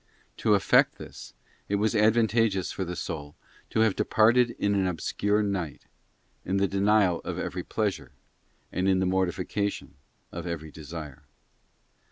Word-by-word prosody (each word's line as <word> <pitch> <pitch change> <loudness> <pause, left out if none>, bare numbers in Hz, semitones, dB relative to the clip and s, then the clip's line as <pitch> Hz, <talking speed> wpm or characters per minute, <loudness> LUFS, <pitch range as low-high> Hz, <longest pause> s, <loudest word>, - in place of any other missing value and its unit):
To - - +3
effect - - +3
this, - - -11 0.3
it 100 - +1
was 105 +3 +1
advantageous 110 -2 +2
for 95 - -3
the 90 0 -5
soul 75 -3 -6 0.3
to 110 - +1
have 110 -3 +3
departed 120 +2 +3
in 100 0 +1
an 95 -2 +1
obscure 105 +4 0
night, 95 -8 -3 0.6
in 95 +2 -1
the 100 0 +2
denial 100 -2 +3
of - - -5
every - - -3
pleasure, - - -2 0.6
and 95 +1 0
in 95 - +3
the 95 - +1
mortification 95 +2 -1 0.4
of 85 +2 -6
every 80 -2 -5
desire. 75 -2 -9
95 Hz, 145 wpm, -27 LUFS, 85-105 Hz, 0.6 s, To